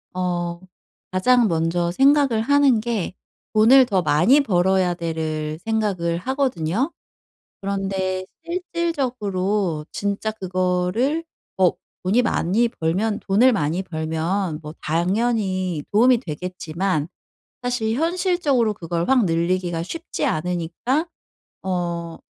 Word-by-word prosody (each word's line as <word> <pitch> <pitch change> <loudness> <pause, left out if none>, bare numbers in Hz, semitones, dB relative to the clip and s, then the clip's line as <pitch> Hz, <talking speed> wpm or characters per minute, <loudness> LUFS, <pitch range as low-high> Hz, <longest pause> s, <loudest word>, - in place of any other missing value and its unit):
어 175 -1 -2 0.5
가장 240 +5 +4
먼저 170 +1 0
생각을 270 -1 +4
하는 280 -2 +4
게 220 -5 -2 0.4
'돈을 245 +5 +7
더 195 -6 +1
많이 175 - +4
벌어야 185 -4 +2
돼.'를 160 -2 -3
생각을 200 -7 0
하거든요. 255 - -1 0.7
그런데 195 -1 -2 0.2
실질적으로 240 - -1
진짜 205 +2 -2
그거를 185 - 0 0.3
뭐 185 -2 +3 0.3
돈이 220 +7 +3
많이 230 +1 +1
벌면 205 +2 -1
돈을 225 +7 +4
많이 175 -3 0
벌면 160 0 -2
뭐 150 +1 -8
당연히 185 0 0
도움이 240 +3 +5
되겠지만 180 - -3 0.5
사실 245 -3 -1
현실적으로 325 - +1
그걸 170 -1 -3
확 260 -5 +4
늘리기가 170 0 0
쉽지 330 - -5
않으니까 180 - -1 0.5
어 170 -3 -3
190 Hz, 230 characters per minute, -22 LUFS, 170-240 Hz, 0.7 s, 돈을